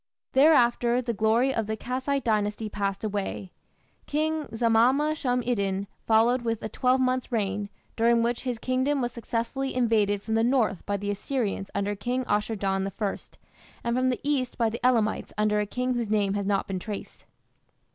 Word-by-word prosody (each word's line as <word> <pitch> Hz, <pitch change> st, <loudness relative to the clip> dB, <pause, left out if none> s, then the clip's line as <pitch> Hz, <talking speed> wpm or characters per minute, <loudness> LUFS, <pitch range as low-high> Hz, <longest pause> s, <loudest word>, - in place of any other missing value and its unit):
Thereafter 245 Hz, -4 st, +4 dB
the 240 Hz, -2 st, -2 dB
glory 225 Hz, +5 st, +2 dB
of 225 Hz, -4 st, -1 dB
the 220 Hz, 0 st, -2 dB
Kassite 260 Hz, +4 st, -2 dB
Dynasty 215 Hz, -1 st, 0 dB
passed 200 Hz, -1 st, -3 dB
away. 200 Hz, -2 st, -3 dB, 0.6 s
King 310 Hz, +1 st, 0 dB
Zamama 240 Hz, +7 st, +3 dB
shum 250 Hz, -5 st, 0 dB
iddin 200 Hz, -5 st, -1 dB, 0.2 s
followed 230 Hz, +3 st, +4 dB
with 230 Hz, -2 st, -2 dB
a 220 Hz, -, -3 dB
twelvemonth's 255 Hz, +1 st, +1 dB
reign, 205 Hz, -2 st, -1 dB, 0.3 s
during 230 Hz, 0 st, +3 dB
which 235 Hz, 0 st, 0 dB
his 250 Hz, -3 st, -3 dB
kingdom 260 Hz, +4 st, 0 dB
was 245 Hz, -1 st, -1 dB
successfully 240 Hz, +3 st, -3 dB
invaded 215 Hz, -5 st, +2 dB
from 220 Hz, -, -3 dB
the 225 Hz, 0 st, +3 dB
north 235 Hz, -6 st, +1 dB
by 205 Hz, 0 st, 0 dB
the 205 Hz, +1 st, -3 dB
Assyrians 205 Hz, -2 st, -2 dB
under 200 Hz, +1 st, -1 dB
King 245 Hz, +5 st, -2 dB
Ashur 210 Hz, +2 st, 0 dB
dan 195 Hz, -1 st, -1 dB
I, 205 Hz, -3 st, -1 dB, 0.7 s
and 235 Hz, 0 st, 0 dB
from 255 Hz, 0 st, +2 dB
the 250 Hz, -, -1 dB
east 275 Hz, -3 st, -1 dB
by 230 Hz, -2 st, +1 dB
the 235 Hz, -, -6 dB
Elamites 230 Hz, -4 st, +1 dB
under 210 Hz, 0 st, +2 dB
a 210 Hz, -, -1 dB
king 250 Hz, +4 st, -1 dB
whose 235 Hz, -3 st, -2 dB
name 205 Hz, -2 st, +1 dB
has 200 Hz, -1 st, -2 dB
not 200 Hz, -1 st, +1 dB
been 190 Hz, -1 st, -3 dB
traced. 205 Hz, +2 st, -7 dB
230 Hz, 175 wpm, -27 LUFS, 205-255 Hz, 0.7 s, Thereafter